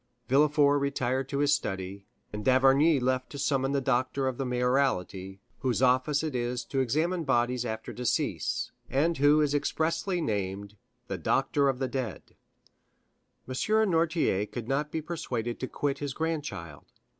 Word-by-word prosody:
Villefort 145 +1 +4
retired 130 -1 -1
to 140 - -2
his 145 +1 +3
study, 95 -3 -3 0.3
and 105 0 -4
d'Avrigny 135 +4 +5
left 130 0 0
to 145 - -8
summon 135 -1 0
the 140 - +1
doctor 130 +1 0
of 130 -1 -3
the 135 - -1
mayoralty, 125 -7 0 0.2
whose 130 -3 0
office 130 +4 +3
it 155 -3 -2
is 120 0 -2
to 135 - -2
examine 160 +7 0
bodies 120 -2 +1
after 110 -1 -5
decease, 125 -1 -1 0.2
and 160 +3 +1
who 145 +2 +5
is 145 -1 +1
expressly 165 +5 0
named 100 - -3 0.3
"the - - -4
doctor 140 -1 +2
of 135 - -1
the 130 0 -1
dead." 125 -8 -5 1.1
M. 130 - -5 0.4
Noirtier 160 - +1
could 120 -2 -5
not 145 +3 0
be 160 - -3
persuaded 120 -8 -4
to 130 - -3
quit 140 0 -2
his 145 -2 -4
grandchild. 150 - -4
135 Hz, 155 wpm, -28 LUFS, 120-145 Hz, 1.1 s, d'Avrigny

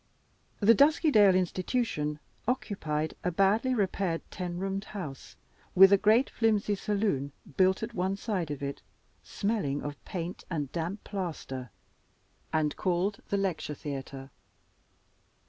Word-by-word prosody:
The 215 +3 +7
Duskydale 280 - +5
Institution 185 - 0 0.3
occupied 160 -11 -1
a - - +1
badly 200 +8 +2
repaired 190 -5 0
ten 175 -2 -4
roomed 195 +2 -2
house, 150 -10 -7 0.4
with 195 +2 +9
a - - +7
great 220 +6 +4
flimsy 215 -2 +1
saloon 195 -9 -1 0.2
built 190 +2 +3
at 230 +1 -4
one 190 -1 0
side 195 -7 -2
of 145 -1 -5
it, 140 0 -4 0.4
smelling 200 -10 -2
of 145 -1 -6
paint 175 -1 -5
and 150 -6 -3
damp 175 +5 -3
plaster, 155 - -5 0.8
and 155 -2 +1
called 185 +3 0
the 200 - +1
Lecture 185 -6 -2
Theater. 135 -1 -6
185 Hz, 125 wpm, -29 LUFS, 150-205 Hz, 0.8 s, with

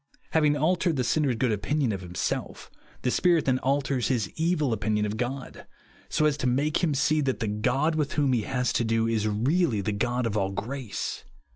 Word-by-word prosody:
Having 150 -2 +3
altered 170 +2 +1
the 130 - 0
sinner's 140 0 +1
good 120 +1 +1
opinion 120 +5 0
of 95 -3 -4
himself, 90 0 -4 0.3
the 125 - +1
Spirit 170 +1 +3
then 130 -1 +2
alters 135 -2 0
his 120 -5 -1
evil 160 -6 +1
opinion 105 0 0
of 105 0 -3
God, 125 +4 -5 0.4
so 155 - +1
as 150 -2 +2
to 130 - -1
make 145 +7 +1
him 155 -4 +2
see 150 +2 +2
that 135 -2 -1
the 110 - -1
God 125 +9 +1
with 150 -3 -1
whom 140 -3 +2
he 120 - +2
has 125 +1 -1
to - - +1
do 115 0 +1
is 110 -2 0
really 125 - +1
the 100 +2 -1
God 120 +4 -1
of 110 -2 -1
all 95 -2 +1
grace. 125 +1 -4
130 Hz, 205 wpm, -27 LUFS, 110-150 Hz, 0.4 s, Having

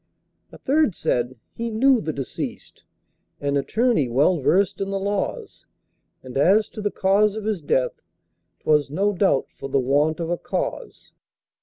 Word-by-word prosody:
A - - -12
third 285 - +1
said, 125 +1 -1 0.2
"He 235 0 -4
knew 245 +2 +3
the 155 - -2
deceased, 135 -3 -7 0.5
An 140 0 -1
attorney 185 - +1
well 145 +8 +3
versed 185 +8 +1
in 195 - -2
the 195 - -1
laws, 200 +1 -3 0.6
And 130 +1 -4
as 200 +8 +4
to 215 - -8
the 205 - 0
cause 200 +2 +2
of 220 - -5
his 215 -5 -1
death, 130 -3 0 0.6
'Twas 150 -2 +2
no 200 +8 0
doubt 190 -8 +2
for 135 - -6
the 135 - +1
want 145 +5 +1
of 165 0 -3
a 175 - -1
cause." - - -5
185 Hz, 160 wpm, -23 LUFS, 140-210 Hz, 0.6 s, as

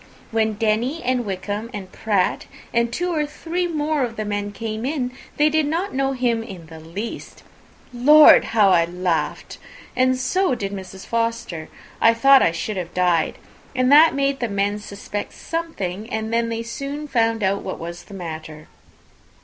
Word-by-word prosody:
When 220 -1 +1
Denny, 225 +8 0
and 250 -2 0
Wickham, 205 +4 -4
and 190 -2 -7
Pratt, 200 -4 0 0.3
and 235 0 +2
two 355 +6 -1
or 305 -2 +1
three 345 +4 -3
more 305 -2 -1
of 235 -2 -3
the 215 - -3
men 205 0 -2
came 220 +1 -5
in, 260 -2 -2 0.3
they 295 - +5
did 305 -1 +2
not 340 +6 -2
know 270 0 0
him 245 -3 0
in 190 -7 -9
the 160 0 -11
least. 180 +8 -7 0.5
Lord! 295 +5 +7
how 215 -3 +3
I 170 -3 +4
laughed! 170 -3 -2 0.4
and 255 0 +3
so 365 +2 +1
did 200 -4 -4
Mrs. 190 -1 -8
Forster. 230 -8 -2 0.3
I 230 0 +6
thought 270 +3 +6
I - - +4
should 190 +5 -4
have 175 -1 -5
died. 180 -3 +1 0.4
And 255 +1 +2
that 310 +2 +7
made 275 0 0
the 240 - -2
men 200 +1 0
suspect 205 0 -6
something, 220 - -4
and 220 +1 -3
then 230 0 +1
they 230 0 -3
soon 280 +5 -5
found 225 -4 +1
out 195 +1 +1
what 190 - -5
was 170 +1 -8
the 200 - -11
matter." 155 -3 -7
225 Hz, 175 wpm, -22 LUFS, 195-270 Hz, 0.5 s, Lord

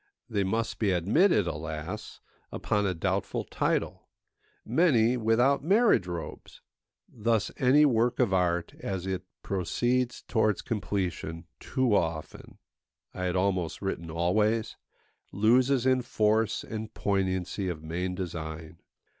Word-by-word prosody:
They 105 -5 0
must 110 +4 -2
be 105 - +2
admitted, 105 - +3
alas! 80 -1 -6 0.3
upon 105 -1 0
a 90 - -1
doubtful 80 - -1
title; - - -2 0.6
many 125 -4 +3
without 120 +5 +2
marriage 195 - +4
robes. 85 -4 -7 0.4
Thus 115 -2 0
any 145 +3 +5
work 120 -3 +2
of 120 -7 +2
art, 85 -2 +1
as 95 -2 -4
it 95 -1 -2 0.2
proceeds 120 +6 -1
towards 110 -3 +1
completion, 90 -6 -3
too 130 -4 0
often—I 85 +2 -5
had 90 0 -1
almost 90 -3 0
written 85 -4 -3
always—loses 110 - 0
in 130 -1 +3
force 110 -1 +1
and 110 0 -6
poignancy 95 -1 -1
of 80 -3 -5
main 90 +3 -3
design. 80 -3 -6
100 Hz, 115 wpm, -28 LUFS, 90-115 Hz, 0.6 s, any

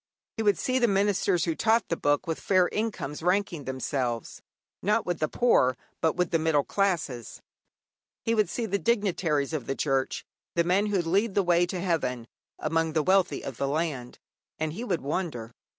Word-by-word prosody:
He - - -1
would 205 -4 +3
see 255 +8 0
the 240 - +4
ministers 195 -3 +2
who 165 - 0
taught 220 +5 +2
the 170 - +1
Book 145 0 +1
with 165 -2 -3
fair 185 -2 +3
incomes 210 -10 -3
ranking 180 -4 0
themselves, 130 -3 -3 0.4
not 210 +3 +1
with 175 -2 -2
the 155 - +1
poor, 130 - +3 0.2
but 160 - +2
with 180 -1 0
the 165 - +2
middle 155 -3 +2
classes; 165 - -2 0.8
he 230 - +1
would 215 -2 +2
see 235 - -2
the 200 -1 -1
dignitaries 180 - 0
of 145 -7 -3
the 135 - -1
Church 135 -2 -1 0.3
the 170 - +3
men 190 +5 +2
who 195 -4 +1
lead 195 +5 +1
the 200 - +3
way 175 0 +3
to 180 +1 -4
heaven 130 -10 -1 0.3
among 165 +1 0
the 155 -1 +2
wealthy 185 -4 +2
of 135 -4 -6
the 140 - -1
land. 140 -4 -2 0.4
And 155 -1 -2
he 220 +8 -5
would 185 -9 -1
wonder. 140 -6 -3
170 Hz, 185 wpm, -27 LUFS, 145-200 Hz, 0.8 s, the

